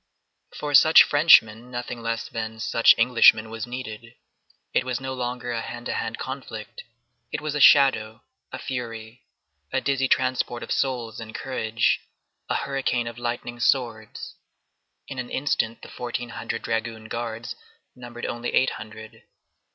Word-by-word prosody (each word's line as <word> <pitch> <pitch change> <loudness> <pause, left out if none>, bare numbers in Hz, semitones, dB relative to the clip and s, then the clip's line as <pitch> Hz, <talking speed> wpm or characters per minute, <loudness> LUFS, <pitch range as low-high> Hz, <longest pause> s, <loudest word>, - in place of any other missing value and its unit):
For 145 -1 -4
such 160 +3 +8
Frenchmen 125 -6 +5
nothing 120 -1 -5
less 115 0 -3
than 110 0 -5
such 115 +1 +5
Englishmen 115 -2 +5
was 115 0 -5
needed. 115 -2 -7 0.6
It - - +2
was 125 -1 -3
no 130 0 -5
longer 125 -1 -4
a 115 -1 -2
hand 120 +1 -7
to - - -2
hand 115 - -3
conflict; 130 -6 -7 0.5
it - - -2
was 150 -1 -4
a 150 - -1
shadow, 115 -6 +5 0.3
a - - -5
fury, 115 -2 -6 0.4
a - - +1
dizzy 135 -1 0
transport 130 -2 0
of - - -8
souls 120 -5 -1
and 110 -1 -9
courage, 115 -4 0 0.5
a - - 0
hurricane 135 -3 -1
of 115 0 -7
lightning 120 0 -4
swords. 115 -4 -1 0.7
In 130 - -6
an 125 - -5
instant 115 -5 -1
the - - -9
fourteen 120 0 -5
hundred 115 -1 -5
dragoon 115 0 -3
guards 115 0 -5 0.4
numbered 120 -1 -8
only 120 +1 -3
eight 130 - +3
hundred. 110 0 -10
120 Hz, 150 wpm, -24 LUFS, 115-130 Hz, 0.7 s, such